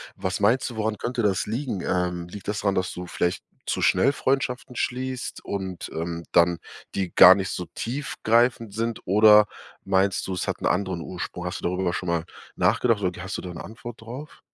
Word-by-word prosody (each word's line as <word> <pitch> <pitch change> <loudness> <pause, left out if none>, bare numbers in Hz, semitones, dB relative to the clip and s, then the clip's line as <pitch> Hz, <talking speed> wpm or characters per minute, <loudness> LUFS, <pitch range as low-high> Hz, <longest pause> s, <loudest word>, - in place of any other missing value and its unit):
was 95 +1 -2
meinst 115 +6 +3
du, 115 - -9
woran 110 -1 -1
könnte 120 0 -2
das 100 -3 +1
liegen? 115 -4 -3
Ähm, 90 -1 -1
liegt 100 +2 -10
das 105 +1 -2
dran, 100 -2 +1
dass 95 -1 -1
du 90 0 -6
vielleicht 90 0 -1 0.2
zu - - -1
schnell 115 +10 +4
Freundschaften 130 -2 -1
schließt 130 +1 -3
und, 95 -3 -4
ähm, 85 +1 -4
dann, 85 0 +4 0.4
die 95 -3 -2
gar 90 +1 +10
nicht 95 -2 -2
so 90 - -4
tiefgreifend 115 -3 0
sind, 115 +1 -2
oder 105 +2 +7 0.4
meinst 95 +1 +1
du, 95 - -3
es 90 - -3
hat - - -2
'n - - -3
anderen 90 -2 0
Ursprung? 90 0 -6
Hast 90 - -3
du - - -7
darüber 90 0 0
schon 90 - -3
mal 85 -1 +1 0.3
nachgedacht 115 -4 +2
oder 90 -1 +1
k 90 - -9
hast 95 +1 -4
du - - -5
da 90 -1 -7
'ne - - -7
Antwort 115 +1 -9
drauf? 130 +7 -9
100 Hz, 200 wpm, -25 LUFS, 90-115 Hz, 0.4 s, gar